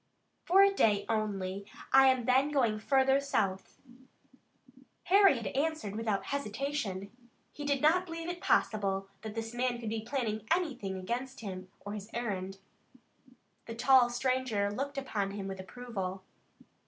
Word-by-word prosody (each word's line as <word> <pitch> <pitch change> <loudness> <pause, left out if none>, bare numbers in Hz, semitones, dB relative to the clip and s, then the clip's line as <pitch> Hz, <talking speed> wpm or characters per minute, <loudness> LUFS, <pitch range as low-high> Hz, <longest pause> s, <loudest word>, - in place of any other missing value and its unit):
"For 385 +3 +6
a 395 0 +4
day 205 - +2
only. 200 -3 -2 0.3
I 270 0 +8
am 260 -2 +3
then 260 +3 +3
going 240 -7 +1
further 265 +3 +3
south." 195 -9 -2 1.3
Harry 390 -6 +5
had 230 - -6
answered 290 -8 -1
without 215 -3 -1
hesitation. 220 -6 -3 0.4
He 290 - -7
did 285 -1 0
not 360 +4 +4
believe 330 0 -6
it 350 +1 -5
possible 195 -2 +1
that 220 -1 -7
this 225 0 -4
man 245 0 -1
could 225 -2 -4
be 220 0 -2
planning 220 -4 -3
anything 255 - -1
against 245 +8 -4
him 185 -3 -6
or 205 - -6
his 210 0 -7
errand. 195 -5 -3 1.1
The 230 - -6
tall 250 0 +5
stranger 245 -5 0
looked 275 +6 -4
upon 210 -7 -2
him 200 -1 -5
with 190 -1 -6
approval. 190 -3 -5
235 Hz, 145 wpm, -31 LUFS, 200-275 Hz, 1.3 s, I